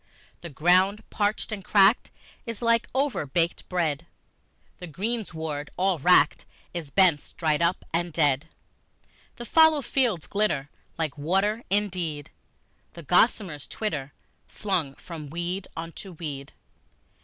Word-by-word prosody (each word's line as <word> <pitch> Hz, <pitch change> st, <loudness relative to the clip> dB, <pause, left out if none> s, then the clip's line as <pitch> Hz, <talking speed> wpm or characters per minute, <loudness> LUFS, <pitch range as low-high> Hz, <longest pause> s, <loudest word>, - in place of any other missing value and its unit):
The 170 Hz, -, -7 dB
ground 185 Hz, +7 st, +3 dB
parched 210 Hz, +2 st, -1 dB
and 205 Hz, -3 st, -5 dB
cracked 205 Hz, +4 st, +4 dB, 0.4 s
is 230 Hz, 0 st, -5 dB
like 230 Hz, 0 st, +2 dB
overbaked 175 Hz, -, 0 dB
bread, 170 Hz, -3 st, -1 dB, 0.7 s
The 180 Hz, -, -7 dB
greensward 160 Hz, -6 st, -4 dB
all 185 Hz, -2 st, +1 dB
wracked 155 Hz, -1 st, +4 dB, 0.3 s
is, 165 Hz, -5 st, -5 dB
bents 175 Hz, -3 st, +3 dB
dried 155 Hz, -1 st, 0 dB
up 170 Hz, +2 st, +1 dB
and 170 Hz, +1 st, 0 dB
dead. 150 Hz, -1 st, +1 dB, 0.9 s
The 240 Hz, -, -8 dB
fallow 320 Hz, 0 st, +5 dB
fields 235 Hz, -, 0 dB
glitter 200 Hz, -9 st, -1 dB, 0.3 s
like 155 Hz, -2 st, -3 dB
water 195 Hz, +9 st, +1 dB
indeed, 180 Hz, -7 st, -2 dB, 0.6 s
And 170 Hz, -3 st, -10 dB
gossamers 180 Hz, -, +2 dB
twitter, 150 Hz, -11 st, -3 dB, 0.4 s
flung 175 Hz, -10 st, -2 dB
from 155 Hz, -4 st, -9 dB
weed 175 Hz, +4 st, -4 dB
unto 165 Hz, +3 st, -7 dB
weed. 145 Hz, -4 st, -7 dB
175 Hz, 120 wpm, -26 LUFS, 155-205 Hz, 0.9 s, fallow